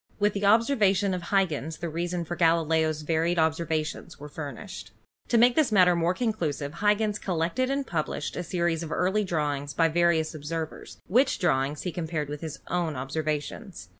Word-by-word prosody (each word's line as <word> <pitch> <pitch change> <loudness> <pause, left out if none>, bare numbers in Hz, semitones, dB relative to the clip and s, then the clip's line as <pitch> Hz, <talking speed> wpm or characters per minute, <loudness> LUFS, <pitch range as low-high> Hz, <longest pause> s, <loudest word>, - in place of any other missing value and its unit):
With 210 0 +2
the 200 0 -1
observations 205 -4 +3
of 180 - -2
Huygens 160 -6 0
the 170 - -4
reasons 170 +1 -3
for 175 - -3
Gali 165 -1 +3
leo's 160 -1 +1
varied 165 +3 +1
observations 160 0 -1
were 150 +1 -9
furnished. 140 - -7 0.4
To 235 - +2
make 240 +1 +5
the 305 -6 +3
matter 180 -4 +5
more 170 +2 +1
conclusive 165 - -2
Huygens 210 0 +2
collected 180 +8 -1
and 275 0 -1
published 155 - -3
a - - -2
series 170 -1 -1
of 160 -2 -6
early 190 +4 +1
drawings 145 -5 -2
by 165 -1 +3
various 165 -1 +2
observers, 160 +1 -6
which 250 - +3
drawings 145 -4 0
he 180 - -2
compared 160 -3 -3
with 150 0 -6
his 160 -2 -6
own 170 -3 -1
observations. 150 - -4
170 Hz, 170 wpm, -27 LUFS, 155-195 Hz, 0.4 s, make